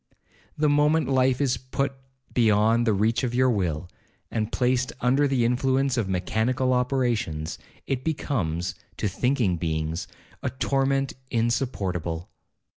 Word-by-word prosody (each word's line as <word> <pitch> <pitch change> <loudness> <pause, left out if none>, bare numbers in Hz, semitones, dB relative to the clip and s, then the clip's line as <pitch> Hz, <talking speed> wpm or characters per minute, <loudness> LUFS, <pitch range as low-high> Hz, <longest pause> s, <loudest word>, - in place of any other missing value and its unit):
The 150 0 +2
moment 150 +2 +3
life 130 -1 +3
is 130 -4 +1
put 135 +2 -2 0.4
beyond 115 0 +3
the 110 - +4
reach 110 +4 +2
of 120 -1 -1
your 130 0 +4
will, 90 -6 -1 0.4
and 110 -1 -1
placed 125 0 +1
under 135 +4 +3
the 130 -4 +2
influence 130 +2 +2
of 110 -6 -1
mechanical 110 +8 +1
operations, 120 - 0 0.3
it 130 -1 -2
becomes, 95 - -1 0.2
to - - 0
thinking 115 -2 +1
beings, 80 +1 -2 0.3
a - - -1
torment 135 +1 0 0.2
insupportable. 100 - -1
125 Hz, 125 wpm, -25 LUFS, 100-130 Hz, 0.4 s, the